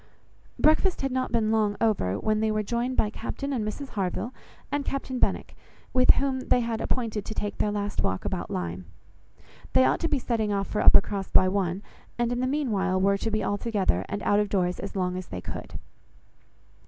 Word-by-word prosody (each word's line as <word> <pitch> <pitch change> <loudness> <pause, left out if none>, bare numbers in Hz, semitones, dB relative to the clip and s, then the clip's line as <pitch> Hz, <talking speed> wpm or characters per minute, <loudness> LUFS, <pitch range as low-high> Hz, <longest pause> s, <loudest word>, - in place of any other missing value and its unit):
Breakfast 315 +4 +3
had 270 - 0
not 255 0 -1
been 220 -2 +1
long 215 -2 +1
over, 195 - +1
when 215 - 0
they 220 0 +1
were 215 0 0
joined 240 +4 -2
by 210 - +2
Captain 280 +5 -4
and 235 -5 -1
Mrs 265 +6 -5
Harville 200 +5 -2 0.4
and 290 0 0
Captain 265 -2 -3
Benwick; - - 0 0.4
with 255 -1 +3
whom 270 -2 0
they 250 -1 +2
had 230 -1 -2
appointed 225 -4 -2
to 215 - -7
take 205 - -3
their 210 - +2
last 205 -1 -2
walk 95 - -1
about - - -3
Lyme. 90 +1 -4 0.9
They 130 0 +6
ought 130 - +2
to 330 - -1
be 295 - +2
setting 225 -4 -1
off 200 -1 0
for 210 - -1
Uppercross 195 -1 +4
by 185 - +5
one, 190 0 -1 0.3
and 240 0 0
in 245 - -1
the 255 - 0
meanwhile 210 -10 0
were 200 +1 +2
to 225 - -1
be 215 0 -1
all 205 - -1
together, 195 - 0
and 205 - -4
out 205 - +3
of 210 -1 0
doors 180 -2 0
as 200 - -6
long 180 -1 -1
as 185 - -6
they 90 - -6
could. - - -7
215 Hz, 205 wpm, -27 LUFS, 195-245 Hz, 0.9 s, They